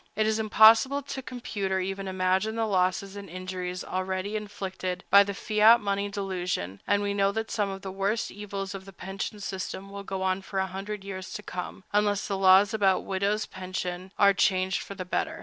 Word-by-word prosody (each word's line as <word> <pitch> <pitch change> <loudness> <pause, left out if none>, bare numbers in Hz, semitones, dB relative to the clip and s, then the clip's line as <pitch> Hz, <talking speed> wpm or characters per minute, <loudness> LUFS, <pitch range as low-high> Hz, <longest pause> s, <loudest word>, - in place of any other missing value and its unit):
It 215 +1 +2
is 220 0 +1
impossible 225 +6 +6
to 270 0 -5
compute 230 -6 -4
or 190 - +2
even 195 +1 -3
imagine 190 +3 0
the 225 0 0
losses 190 0 0
and 200 -1 -8
injuries 185 0 -5
already 185 +2 -3
inflicted 190 -3 -4
by 200 +1 +9
the 200 0 -5
fiat 215 +3 +5
money 200 0 -1
delusion; 180 - -3
and 205 0 +2
we 200 0 0
know 200 0 +2
that 225 +2 -3
some 205 -2 0
of 195 0 -7
the 190 - -5
worst 195 +4 -1
evils 200 -1 -5
of 190 -1 -8
the 195 - -12
pension 195 +3 -5
system 195 0 -5
will 200 0 -6
go 190 -1 -4
on 190 0 0
for 195 +1 -6
a 190 - +2
hundred 195 +2 -6
years 190 -2 -7
to 210 - -6
come, 185 +1 -6
unless 205 -1 +2
the 200 - -1
laws 195 +2 +6
about 195 -3 +2
widows' 200 +2 0
pensions 185 0 -5
are 200 -1 +6
changed 190 -1 +1
for 200 - -8
the 185 -1 -5
better. 320 - -2
195 Hz, 200 wpm, -27 LUFS, 185-205 Hz, -, by